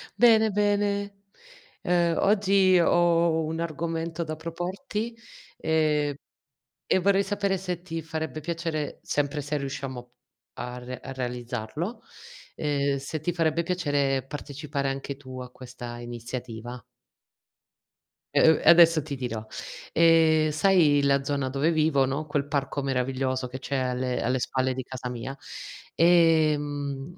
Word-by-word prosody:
bene, 220 Hz, -2 st, +5 dB
bene. 205 Hz, 0 st, 0 dB, 0.6 s
Ehm, 175 Hz, -1 st, +2 dB
oggi 195 Hz, -2 st, +4 dB
ho 170 Hz, -1 st, +3 dB
un 160 Hz, +1 st, -3 dB
argomento 165 Hz, +1 st, -3 dB
da 155 Hz, -1 st, -5 dB
proporti, 185 Hz, -, -4 dB, 0.4 s
ehm, 150 Hz, -2 st, +1 dB, 0.7 s
e -, -, +3 dB
vorrei 195 Hz, +1 st, +3 dB
sapere 200 Hz, -1 st, 0 dB
se 180 Hz, -2 st, -4 dB
ti 165 Hz, -2 st, -5 dB
farebbe 160 Hz, 0 st, -4 dB
piacere, 160 Hz, -2 st, -3 dB
sempre 145 Hz, 0 st, -1 dB
se 145 Hz, +1 st, -2 dB
riusciamo 135 Hz, -3 st, -5 dB, 0.5 s
a 125 Hz, 0 st, -5 dB
re 125 Hz, 0 st, -7 dB
a -, -, -7 dB
realizzarlo, 125 Hz, -, -4 dB, 0.5 s
ehm, 140 Hz, -2 st, 0 dB
se 140 Hz, +3 st, -5 dB
ti 175 Hz, +4 st, -1 dB
farebbe 165 Hz, -1 st, +1 dB
piacere 145 Hz, -6 st, 0 dB
partecipare 145 Hz, 0 st, -4 dB
anche 135 Hz, +1 st, -5 dB
tu 130 Hz, -2 st, -9 dB
a 125 Hz, -1 st, -8 dB
questa 125 Hz, -1 st, -9 dB
iniziativa? 120 Hz, 0 st, -7 dB, 1.5 s
E -, -, +6 dB
uhm, 160 Hz, -, +5 dB
e -, -, +5 dB
adesso 165 Hz, -2 st, +7 dB
ti 145 Hz, -1 st, -5 dB
dirò. 115 Hz, -4 st, -4 dB, 0.5 s
Ehm, 160 Hz, -1 st, +5 dB
sai 155 Hz, -3 st, +4 dB
la 140 Hz, 0 st, +3 dB
zona 140 Hz, -1 st, -1 dB
dove 140 Hz, +5 st, +1 dB
vivo, 155 Hz, -4 st, +3 dB
no, 140 Hz, +4 st, -2 dB
quel 145 Hz, -2 st, -1 dB
parco 140 Hz, 0 st, -1 dB
meraviglioso 130 Hz, -1 st, -1 dB
che 130 Hz, +1 st, -7 dB
c'è 140 Hz, +2 st, -4 dB
alle 125 Hz, 0 st, -1 dB
alle 125 Hz, +3 st, 0 dB
spalle 130 Hz, +1 st, 0 dB
di 130 Hz, 0 st, -4 dB
casa 125 Hz, 0 st, -6 dB
mia, 125 Hz, +2 st, -5 dB, 0.6 s
ehm, 155 Hz, -3 st, +2 dB
150 Hz, 130 wpm, -26 LUFS, 130-170 Hz, 1.5 s, adesso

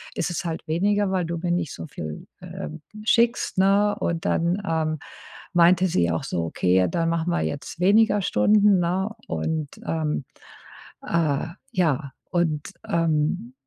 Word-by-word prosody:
ist -, -, -1 dB
es 175 Hz, +1 st, -3 dB
halt 165 Hz, -1 st, -4 dB
weniger, 200 Hz, +5 st, +1 dB
weil 185 Hz, -3 st, 0 dB
du 170 Hz, +1 st, -3 dB
mir 175 Hz, -1 st, -1 dB
nicht 175 Hz, -4 st, -1 dB
so -, -, -7 dB
viel, 80 Hz, -, -7 dB
ähm, 75 Hz, 0 st, -7 dB, 0.2 s
schickst,“ 235 Hz, -2 st, +2 dB
ne? 200 Hz, +2 st, +4 dB
Und 165 Hz, -1 st, -2 dB
dann, 175 Hz, +4 st, +1 dB
ähm, 155 Hz, -2 st, -1 dB, 0.5 s
meinte 175 Hz, +2 st, +5 dB
sie 85 Hz, -, +1 dB
auch 80 Hz, -, -2 dB
so: 85 Hz, -, -2 dB
„Okay, 90 Hz, +2 st, +1 dB
ja 90 Hz, -, +3 dB
dann 165 Hz, -, 0 dB
machen 170 Hz, +1 st, 0 dB
wir 175 Hz, -, +1 dB
jetzt 145 Hz, +3 st, -4 dB
weniger 205 Hz, +2 st, +4 dB
Stunden,“ 205 Hz, 0 st, +4 dB
ne? 185 Hz, +4 st, 0 dB, 0.2 s
Und, 155 Hz, -3 st, -2 dB, 0.2 s
ähm, 155 Hz, -4 st, -1 dB, 0.8 s
äh, 160 Hz, -3 st, 0 dB, 0.3 s
ja 150 Hz, -6 st, +1 dB, 0.2 s
und, 160 Hz, -4 st, 0 dB, 0.2 s
ähm, 165 Hz, +8 st, 0 dB
170 Hz, 155 wpm, -24 LUFS, 155-190 Hz, 0.8 s, meinte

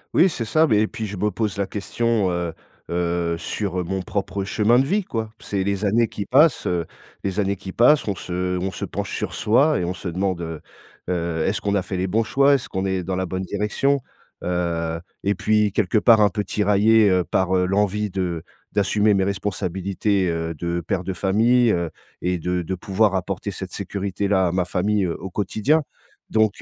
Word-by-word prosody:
Oui, 185 Hz, -, +6 dB
c'est 115 Hz, -8 st, -4 dB
ça 155 Hz, +7 st, +3 dB
mais 105 Hz, -4 st, +3 dB
et 110 Hz, -, +2 dB
puis 110 Hz, -2 st, -5 dB
je 100 Hz, -1 st, -6 dB
me 105 Hz, +2 st, 0 dB
pose 105 Hz, 0 st, -2 dB
la 100 Hz, -, 0 dB
question, 105 Hz, 0 st, 0 dB
heu 85 Hz, -2 st, -2 dB, 0.4 s
heu, 85 Hz, -1 st, 0 dB
sur 90 Hz, 0 st, -2 dB
mon 95 Hz, +2 st, -3 dB
propre 100 Hz, 0 st, -3 dB
chemin 105 Hz, +5 st, +3 dB
de 135 Hz, -, +3 dB
vie 200 Hz, +5 st, +1 dB
quoi. 110 Hz, -7 st, -4 dB
C'est 100 Hz, -2 st, -2 dB
les 100 Hz, +1 st, -1 dB
années 115 Hz, +3 st, +3 dB
qui 100 Hz, -, -6 dB
passent. 145 Hz, 0 st, +4 dB
Heu, 85 Hz, -2 st, 0 dB, 0.4 s
les 100 Hz, +1 st, -2 dB
années 100 Hz, 0 st, +1 dB
qui 95 Hz, 0 st, -8 dB
passent, 135 Hz, +4 st, +4 dB
on 100 Hz, -, +1 dB
se 90 Hz, 0 st, -3 dB
on 95 Hz, +1 st, -1 dB
se -, -, -5 dB
penche -, -, -4 dB
sur -, -, -3 dB
soi 140 Hz, +8 st, +3 dB
et -, -, -1 dB
on 90 Hz, +1 st, -3 dB
se 95 Hz, -, -7 dB
demande, 90 Hz, 0 st, -1 dB
heu 80 Hz, -2 st, -5 dB, 0.5 s
heu, 85 Hz, -2 st, -1 dB
est-ce 100 Hz, -, -1 dB
qu'on 100 Hz, 0 st, 0 dB
a 100 Hz, -, +2 dB
fait 95 Hz, 0 st, -4 dB
les 95 Hz, -, 0 dB
bons 110 Hz, +5 st, +1 dB
choix? 140 Hz, +5 st, +4 dB
Est-ce 135 Hz, -, 0 dB
qu'on 95 Hz, 0 st, -2 dB
est 95 Hz, -1 st, 0 dB
dans 95 Hz, +1 st, -2 dB
la 95 Hz, 0 st, -1 dB
bonne 95 Hz, +1 st, -3 dB
direction? 105 Hz, +8 st, 0 dB, 0.4 s
Heu, 85 Hz, -2 st, -1 dB, 0.2 s
et 100 Hz, +1 st, +2 dB
puis 105 Hz, +1 st, +2 dB
quelque 105 Hz, +1 st, +1 dB
part 110 Hz, 0 st, +6 dB
un 105 Hz, -, +5 dB
peu 105 Hz, +2 st, -2 dB
tiraillé, 105 Hz, +1 st, +4 dB
heu, 90 Hz, -1 st, +3 dB
par, 95 Hz, +3 st, +1 dB
heu, 90 Hz, -, +2 dB
l'envie 105 Hz, +1 st, 0 dB
de 90 Hz, -4 st, -2 dB, 0.3 s
d'assumer 105 Hz, +1 st, +2 dB
mes 95 Hz, -, +2 dB
responsabilités, 95 Hz, 0 st, -1 dB
heu, 80 Hz, 0 st, -2 dB
de 85 Hz, +2 st, -2 dB
père 90 Hz, +3 st, -2 dB
de 95 Hz, +1 st, -3 dB
famille, 115 Hz, +6 st, +3 dB
heu, 85 Hz, -2 st, 0 dB, 0.3 s
et 90 Hz, 0 st, 0 dB
de 90 Hz, +2 st, -1 dB
de 95 Hz, +3 st, -3 dB
pouvoir 100 Hz, +2 st, +1 dB
apporter 95 Hz, +2 st, -3 dB
cette 95 Hz, -1 st, -6 dB
sécurité 100 Hz, 0 st, -3 dB
là 95 Hz, -2 st, +3 dB
à -, -, -2 dB
ma 90 Hz, -1 st, 0 dB
famille, 100 Hz, +2 st, 0 dB
heu, 85 Hz, -, -2 dB
au 95 Hz, 0 st, -7 dB
quotidien. 110 Hz, -, +1 dB, 0.5 s
Donc, 110 Hz, -2 st, +1 dB
95 Hz, 210 wpm, -22 LUFS, 90-105 Hz, 0.5 s, Oui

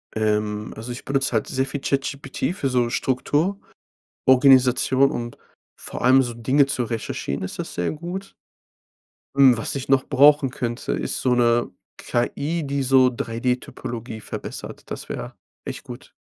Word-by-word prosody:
Ähm. 105 Hz, -1 st, -1 dB
Also, 115 Hz, +3 st, -7 dB
ich 120 Hz, -, -8 dB
benutze 135 Hz, -1 st, 0 dB
halt 110 Hz, -, +1 dB
sehr 130 Hz, 0 st, 0 dB
viel 140 Hz, +1 st, -4 dB
ChatGPT 140 Hz, +2 st, -2 dB
für 135 Hz, -8 st, -1 dB
so 120 Hz, -2 st, +1 dB
Struktur, 145 Hz, +10 st, 0 dB, 0.7 s
Organisation 130 Hz, 0 st, +5 dB
und 120 Hz, 0 st, -5 dB, 0.4 s
vor -, -, -7 dB
allem 130 Hz, +1 st, +6 dB
so 120 Hz, -2 st, -4 dB
Dinge 130 Hz, +5 st, +3 dB
zu 130 Hz, -3 st, -1 dB
recherchieren 110 Hz, -, -4 dB
ist 90 Hz, -, -6 dB
das -, -, -5 dB
sehr 85 Hz, -, -1 dB
gut. 175 Hz, +5 st, -6 dB, 1.0 s
Hm, 135 Hz, -3 st, +7 dB
was 115 Hz, -, -3 dB
ich 135 Hz, -, -4 dB
noch 135 Hz, -1 st, +3 dB
brauchen 145 Hz, 0 st, +5 dB
könnte, 120 Hz, -1 st, -4 dB
ist -, -, -2 dB
so 125 Hz, -1 st, +2 dB
'ne 120 Hz, -1 st, +2 dB, 0.3 s
KI, 150 Hz, +7 st, -1 dB
die 140 Hz, -1 st, -1 dB
so 130 Hz, 0 st, +5 dB
3D-Typologie 120 Hz, -1 st, -4 dB
verbessert. -, -, -8 dB
Das -, -, -6 dB
wäre -, -, -6 dB, 0.3 s
echt -, -, -6 dB
gut. -, -, -10 dB
130 Hz, 150 wpm, -23 LUFS, 120-140 Hz, 1.0 s, Hm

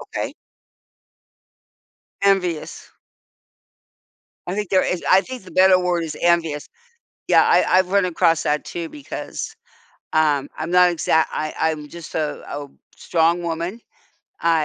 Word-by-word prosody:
Okay. -, -, -5 dB, 1.9 s
Envious. 185 Hz, -5 st, 0 dB, 1.5 s
I 180 Hz, -, -3 dB
think 210 Hz, -2 st, -3 dB
there 190 Hz, -1 st, +3 dB
is 180 Hz, -, -2 dB
I 185 Hz, -, +7 dB
think 255 Hz, 0 st, -8 dB
the 185 Hz, -, -13 dB
better 185 Hz, 0 st, +5 dB
word 180 Hz, -2 st, 0 dB
is 155 Hz, -2 st, -6 dB
envious. 165 Hz, -4 st, +1 dB, 0.6 s
Yeah, -, -, +6 dB
I -, -, +5 dB
I've 185 Hz, -1 st, +2 dB
run 200 Hz, 0 st, +3 dB
across 165 Hz, -2 st, +2 dB
that 150 Hz, 0 st, 0 dB
too 170 Hz, -2 st, -5 dB
because, 290 Hz, -2 st, -7 dB, 0.6 s
um, 150 Hz, -3 st, +2 dB
I'm 160 Hz, +2 st, -4 dB
not 180 Hz, 0 st, +6 dB
exact 160 Hz, -2 st, +1 dB
I 155 Hz, 0 st, -3 dB
I'm 155 Hz, -2 st, -1 dB
just 170 Hz, +2 st, -10 dB
a 155 Hz, -2 st, -2 dB
oh, 145 Hz, -1 st, -6 dB, 0.2 s
strong 170 Hz, +1 st, +1 dB
woman, 170 Hz, +5 st, -3 dB, 0.6 s
I, 165 Hz, -2 st, +2 dB
170 Hz, 135 wpm, -21 LUFS, 155-185 Hz, 1.9 s, I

